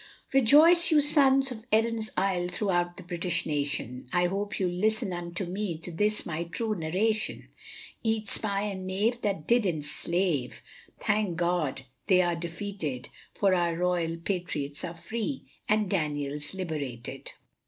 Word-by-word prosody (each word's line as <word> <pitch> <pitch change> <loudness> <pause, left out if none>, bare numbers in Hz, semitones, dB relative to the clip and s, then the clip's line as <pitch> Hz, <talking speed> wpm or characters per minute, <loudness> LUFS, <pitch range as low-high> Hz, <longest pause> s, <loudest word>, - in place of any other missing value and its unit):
Rejoice 305 +7 +7
you 310 -2 +5
sons 275 -2 +5
of 220 -3 -7
Erin's 220 0 +2
Isle 185 -2 +1
throughout 175 -2 -1
the 185 - -9
British 175 -1 -2
nation, 140 -4 -3
I 180 0 +3
hope 200 +3 -2
you'll 185 -2 +1
listen 205 +1 0
unto 175 +2 -4
me 185 -1 -3
to 165 +2 -8
this 210 +5 0
my 170 +1 -3
true 220 +6 -2
narration. 210 +5 -1 0.5
Each 220 -2 -1
spy 200 -2 0
and 190 -3 -4
knave 215 +6 0
that 195 -7 -1
did 240 0 +4
enslave, 165 - -1 0.3
thank 210 -4 0
God 170 -6 0 0.2
they 185 -1 +5
are 175 -1 +1
defeated, 165 -5 -5 0.3
For 195 -2 +3
our 170 -2 +1
loyal 175 -2 0
Patriots 165 -6 -3
are 170 -1 -5
free, 230 - -4 0.2
and 215 -1 +3
Daniel's 150 -3 -2
liberated. 145 -10 -5
180 Hz, 145 wpm, -28 LUFS, 165-215 Hz, 0.5 s, Rejoice